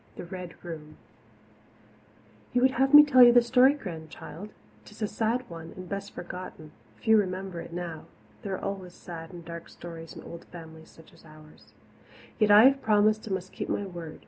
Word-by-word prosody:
The - - -8
Red 180 -1 -8
Room 155 -3 -8 1.6
You 250 0 +2
would 260 - +5
have 270 0 +1
me 295 0 +11
tell 270 -4 +5
you 240 -1 +10
the 240 0 +6
story, 255 +4 +5
Grandchild? 170 - -9 0.3
'Tis 210 +1 -9
a - - +1
sad 225 +4 -1
one 165 -1 -9
and 185 0 -8
best 200 +2 -5
forgotten 175 -3 -8 0.2
few 220 -1 +3
remember 185 -3 -2
it - - -10
now. 170 -2 -6 0.4
There 200 -5 -3
are - - -7
always 185 -3 -5
sad 165 -1 -9
and 175 -2 -11
dark 170 0 -8
stories 165 -1 -10
in - - -10
old 170 - -10
families 160 -2 -12
such 160 +1 -18
as 165 - -20
ours. 155 -1 -17 0.7
Yet 215 -2 +3
I 205 +1 +9
have 275 +1 +5
promised 215 0 +2
and 195 - 0
must 185 0 -7
keep - - -5
my 205 - -1
word. 170 -4 -8
185 Hz, 190 wpm, -28 LUFS, 165-215 Hz, 1.6 s, me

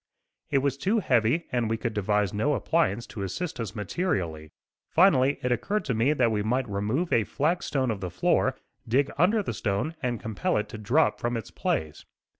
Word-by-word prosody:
It 135 -2 +2
was 140 -1 0
too 200 +10 +1
heavy 130 - +2
and 120 -4 0
we 115 - 0
could 115 0 -3
devise 105 -1 0
no 140 +8 +1
appliance 105 0 +1
to 105 - -8
assist 110 - -4
us 110 -2 -4
materially. 90 - -2 0.4
Finally 145 -6 +4
it 125 - 0
occurred 205 - 0
to 125 - 0
me 115 +6 +2
that 125 -6 +2
we 105 -1 0
might 125 +4 0
remove 105 - -1
a 115 - +4
flag 160 - 0
stone 130 -4 0
of 100 -3 -4
the 90 - -3
floor, 90 +1 +1 0.3
dig 135 +5 +2
under 205 +6 +4
the 150 - -3
stone 105 +9 -1
and 120 -3 -1
compel 110 -2 -1
it 105 - -2
to 110 - -8
drop 125 +10 +2
from 120 0 -1
its 115 - -7
place. 75 -1 -2
120 Hz, 200 wpm, -27 LUFS, 105-145 Hz, 0.4 s, Finally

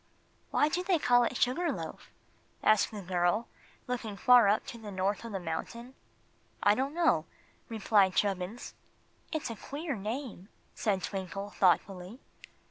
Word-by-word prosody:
"Why 295 - +3
do 350 +4 -1
they 365 -2 +2
call 245 -4 +4
it 245 - -2
'Sugar 280 +8 +1
Loaf'?" - - -7 0.5
asked 215 -1 +4
the 210 -3 -7
girl, 180 +5 +1 0.4
looking 235 -5 -4
far 245 -3 +6
up 210 +2 +2
to 240 -3 -8
the 215 -2 -8
top 195 +3 -1
of 230 - -7
the 195 - -3
mountain. 235 +9 -5 0.7
"I 205 - +6
don't 270 +6 -2
know," 320 - +2 0.4
replied 205 -4 +3
Chubbins. 195 +3 -1 0.6
"It's 310 -7 -3
a - - -5
queer 285 - -5
name," 215 -1 -5 0.2
said 195 -4 -1
Twinkle, 195 +1 -4
thoughtfully. 185 +3 +1
215 Hz, 145 wpm, -30 LUFS, 195-250 Hz, 0.7 s, far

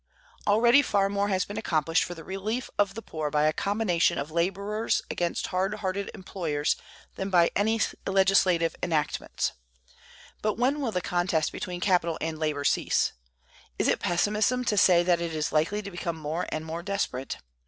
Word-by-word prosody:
Already 235 +6 +6
far 200 -7 +1
more 200 0 0
has 190 -2 +1
been 205 +2 -5
accomplished 165 -5 +1
for 175 - -7
the 165 - -10
relief 210 +8 -4
of 200 0 +2
the 225 - -6
poor 155 -2 -3
by 150 0 +1
a 155 0 +3
combination 200 -4 +1
of 145 +3 -4
laborers 200 +6 0
against 175 -1 -1
hard 190 +3 0
hearted 200 -1 -3
employers 160 -5 -1 0.4
than 190 - -3
by 175 -3 +4
any 220 +3 +2 0.3
legislative 190 -3 +3
enactments; 155 -3 -1 0.9
but 215 -1 0
when 270 +5 +1
will 250 -5 -1
the 180 - -1
contest 175 -2 0
between 180 -3 -5
capital 175 -4 +2
and 160 -1 -3
labor 150 -2 -1
cease? - - +2 0.6
Is - - +1
it - - +2
pessimism 210 +7 +1
to 215 - +1
say 180 -3 +5
that 175 -1 +2
it 165 -2 -3
is 155 0 -1
likely 170 +7 +1
to 200 - -7
become 170 -2 -4
more 160 +3 -3
and 155 0 -3
more 165 +1 -4
desperate? 175 -9 -3
185 Hz, 175 wpm, -27 LUFS, 165-205 Hz, 0.9 s, Already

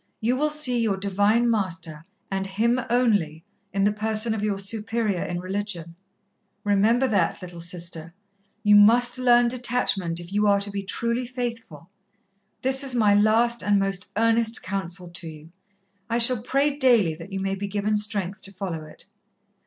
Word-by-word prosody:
You 235 +3 0
will 300 +3 0
see 300 -5 +1
your 210 -4 0
Divine 205 +4 +1
Master, 180 -8 -2 0.3
and 195 0 -2
Him 230 +6 0
only, 205 -11 +1 0.3
in 195 0 0
the 205 - +3
person 220 +1 0
of 220 - -3
your 205 -2 -1
Superior 210 -1 -2
in 175 0 -4
religion. 185 -3 -5 0.7
Remember 215 +6 +2
that, 215 -5 0
little 175 -2 -9
Sister. 170 -1 -5 0.5
You 210 -1 +5
must 245 +4 +5
learn 240 -1 +4
detachment 235 -8 -1
if 175 +2 -10
you 210 +1 +2
are 200 0 +4
to 200 0 -4
be 200 0 -3
truly 235 +5 -2
faithful. 230 - -6 0.7
That 265 +2 +3
is 265 -2 +1
my 215 -4 +4
last 225 +3 +3
and 205 0 +2
most 195 -1 0
earnest 230 0 +2
counsel 185 -2 -4
to 170 -1 -6
you. 155 +1 -13 0.6
I 230 - 0
shall 240 -1 +4
pray 275 +4 0
daily 235 - +4
that 165 +5 -11
you 195 - -3
may 195 0 -2
be 200 +1 -4
given 205 +1 -1
strength 205 -2 -3
to 195 - -12
follow 185 -5 -5
it." 155 - -13
205 Hz, 170 wpm, -24 LUFS, 190-235 Hz, 0.7 s, You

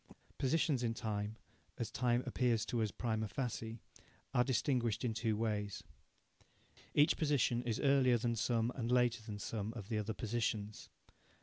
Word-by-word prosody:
Positions 145 -1 +2
in 115 -1 0
time, 110 -2 -3 0.4
as 120 -3 -3
time 120 0 +1
appears 120 -3 +1
to 120 -1 -1
us 110 - +1
prima 110 0 -2
facie, 115 -2 -3 0.6
are 125 -2 +4
distinguished 125 -3 +1
in 115 - 0
two 110 -1 0
ways. 105 -2 -2 1.1
Each 150 +2 +5
position 140 -6 +2
is 115 -3 -1
Earlier 135 -3 +4
than 115 +1 0
some, 115 +1 +1
and 120 -1 -2
Later 120 -2 +3
than 110 -1 -6
some, 105 0 -3
of 105 -3 -7
the 110 -2 0
other 105 +1 -3
positions. 110 -2 -2
115 Hz, 150 wpm, -36 LUFS, 110-125 Hz, 1.1 s, Each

